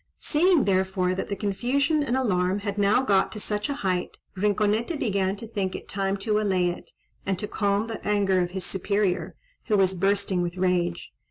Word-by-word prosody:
Seeing, 335 0 +3
therefore, 190 -1 +1
that 185 - -3
the 200 - -2
confusion 255 - 0
and 260 -3 0
alarm 190 -5 +1
had 200 0 -3
now 205 +6 +3
got 195 -6 +2
to 215 - -6
such 210 +2 -2
a 285 - -1
height, 180 -1 -1 0.2
Rinconete 210 - +1
began 195 -4 0
to 215 - -8
think 200 -4 -3
it - - -8
time 195 0 -1
to 215 -1 +2
allay 190 -4 +1
it, 175 - -7 0.3
and 190 -1 -1
to 210 - -4
calm 205 0 0
the 225 -1 -6
anger 200 -2 +2
of 175 - -1
his 190 +1 -5
superior, 190 -3 -1 0.3
who 210 - +2
was 190 -1 +3
bursting 195 0 +1
with 175 +1 -3
rage. 175 -2 0
200 Hz, 190 wpm, -25 LUFS, 185-210 Hz, 0.3 s, Seeing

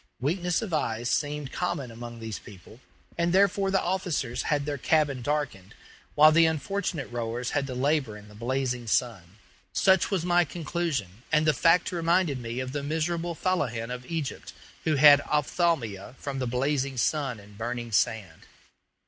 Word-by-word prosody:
Weakness 175 - 0
of 195 -6 -5
eyes 120 -5 -1
seemed 145 -2 -1
common 150 -9 -3
among 120 0 -8
these 110 -2 -5
people, 105 +3 -14 0.4
and 170 0 +2
therefore 195 +1 +3
the 195 0 +2
officers 175 -9 -1
had 145 -2 0
their 145 -2 -3
cabin 145 -3 +1
darkened, 120 -8 -3 0.4
while 155 +1 +8
the 165 +1 +5
unfortunate 160 -1 -2
rowers 120 +1 -3
had 140 -1 0
to 130 - -5
labor 135 -4 0
in 105 0 -14
the 105 - -15
blazing 125 +1 -2
sun. 100 -6 -1 0.4
Such 190 -2 +4
was 185 -4 -1
my 175 0 +4
conclusion, 150 - -3
and 150 +1 +3
the 155 - +4
fact 165 +7 +3
reminded 170 -4 +1
me 115 +1 -5
of 130 0 -4
the 145 +1 -3
miserable 165 +3 -2
fellahin 125 -11 -1
of 125 0 -8
Egypt, 160 -4 -4 0.3
who 155 -2 +2
have 145 0 +8
ophthalmia 145 - 0
from 140 -2 -5
the 130 - -1
blazing 135 +2 -1
sun 135 -2 0
and 100 0 -15
burning 120 +1 -4
sand. 100 -5 -1
140 Hz, 165 wpm, -27 LUFS, 120-165 Hz, 0.4 s, while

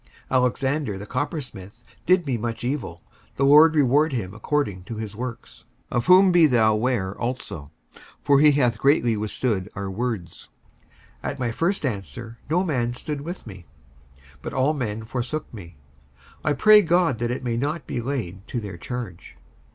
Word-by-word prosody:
55:004:014 - - +1
Alexander 130 -2 0
the 100 - -7
coppersmith 120 - -5 0.2
did 180 -2 +4
me 135 -3 -1
much 115 0 -4
evil: 120 - -4 0.3
the 140 - 0
Lord 155 +3 +7
reward 145 +2 +3
him 100 -6 -3
according 105 -5 -2
to 115 - -6
his 110 -1 -6
works: 120 0 -7 0.3
55:004:015 - - 0
Of 120 - 0
whom 185 +1 +7
be 175 -3 +6
thou 110 -5 +3
ware 105 -4 -1
also; 120 - -4 0.5
for 140 -1 +4
he 150 0 +6
hath 120 -6 +1
greatly 130 -4 +3
withstood 105 -2 -2
our 100 -1 -4
words. 110 -5 -4 0.7
55:004:016 - - -1
At 140 - -13
my 120 -2 -1
first 170 - -1
answer 115 +1 -5
no 175 +4 +2
man 120 -8 -1
stood 145 +2 -5
with 170 +5 -7
me, 95 -7 -11 0.7
but - - -6
all 135 +3 +2
men 110 -6 -3
forsook 125 +7 -4
me: 85 -8 -11 0.7
I 150 - +2
pray 210 +8 +7
God 175 - +2
that 120 0 -1
it 125 +1 -3
may 120 -2 -1
not 145 +6 -2
be 120 - -3
laid 110 -7 -4
to 120 - -3
their 100 -5 -7
charge. 100 - -7
125 Hz, 175 wpm, -24 LUFS, 110-145 Hz, 0.7 s, Lord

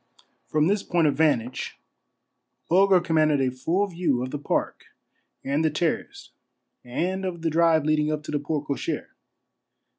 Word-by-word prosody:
From 155 0 +2
this 200 +3 +1
point 175 -4 +1
of 145 - +2
van 150 -2 +4
tage 125 +3 -7 0.9
Bulger 190 +1 +5
commanded 155 -4 +2
a 130 -1 +1
full 165 +10 0
view 170 -9 -1
of 130 - -5
the 145 - -4
park 145 - -2 0.6
and 140 +3 0
the 160 - +3
terrace 160 +2 -3 0.5
and 180 +10 -2
of 175 -3 -4
the 165 - 0
drive 165 -1 +3
leading 155 0 +2
up 155 -1 -3
to - - -7
the 145 - 0
porte 150 0 -3
cochere. 140 - -3
155 Hz, 160 wpm, -25 LUFS, 145-170 Hz, 0.9 s, Bulger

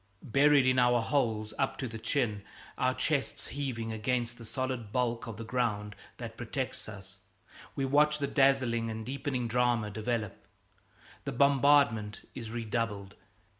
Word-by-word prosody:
Buried 140 +3 +5
in 130 0 +4
our 120 -1 +4
holes 110 -4 0
up 135 - 0
to 130 - -3
the 115 -1 -7
chin, 110 -3 0 0.3
our 130 0 +1
chests 145 -4 -1
heaving 125 -6 -3
against 120 +2 -1
the - - -9
solid 130 -3 -3
bulk 120 -1 0
of 110 -3 -6
the 115 - -6
ground 105 -4 -1 0.2
that 115 -2 -7
protects 125 0 -4
us, 95 -2 -10 0.6
we 135 - 0
watch 150 +2 +4
the 145 - -1
dazzling 130 -5 +2
and 110 0 -5
deepening 130 -2 -2
drama 120 -2 +1
develop. 110 0 -3 0.8
The - - -3
bombardment 140 -5 +3
is 115 -4 -6
redoubled. 110 -3 -3
120 Hz, 145 wpm, -31 LUFS, 110-135 Hz, 0.8 s, Buried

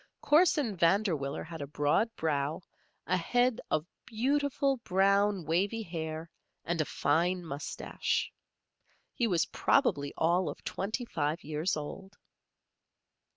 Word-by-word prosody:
Corson 295 - +3
Vanderwiller 170 -6 +1
had 160 -1 -8
a 140 - -4
broad 150 - +1
brow, 150 0 -1 0.4
a 185 - +1
head 245 +7 +1
of 155 0 0 0.2
beautiful, 275 +3 +1
brown, 200 -2 +2
wavy 195 +8 0
hair, 160 -2 -5 0.3
and 170 -1 0
a - - 0
fine 175 +7 +1
mustache. 145 -2 -2 0.8
He 240 - +1
was 175 -5 +2
probably 145 - +1
all 175 +3 +2
of - - -8
twenty 215 +6 -3
five 155 -4 -2
years 155 +3 -1
old. 190 +7 -7
180 Hz, 115 wpm, -31 LUFS, 155-220 Hz, 0.8 s, Corson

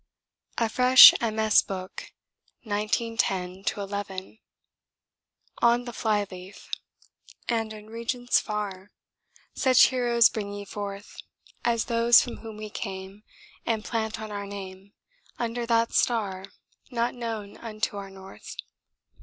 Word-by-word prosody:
A 230 - +2
FRESH 250 +3 +9
MS. 220 -2 +3
BOOK. 185 -1 -7 0.5
1910 205 -3 -1 0.2
11. 200 0 -6 1.2
[On 240 +1 +3
the 240 - -6
Flyleaf] 200 -4 -3 0.8
'And 225 -2 -1
in 215 0 -10
regions 235 +2 0
far 205 -3 -5 0.6
Such 255 -1 +5
heroes 240 -2 +4
bring 205 -2 -5
ye 205 0 -7
forth 200 0 -7 0.5
As 230 -1 +1
those 235 0 +5
from 245 - -3
whom 220 -2 -10
we 215 0 -7
came 195 -1 -7 0.4
And 220 -2 -2
plant 220 -2 -2
our 205 -2 -6
name 195 0 -9 0.4
Under 235 0 -3
that 230 0 +2
star 200 -6 0 0.4
Not 235 -1 -1
known 225 -4 -6
unto 215 -2 -4
our 195 -1 -7
North.' 195 0 -11
215 Hz, 110 wpm, -26 LUFS, 200-235 Hz, 1.2 s, FRESH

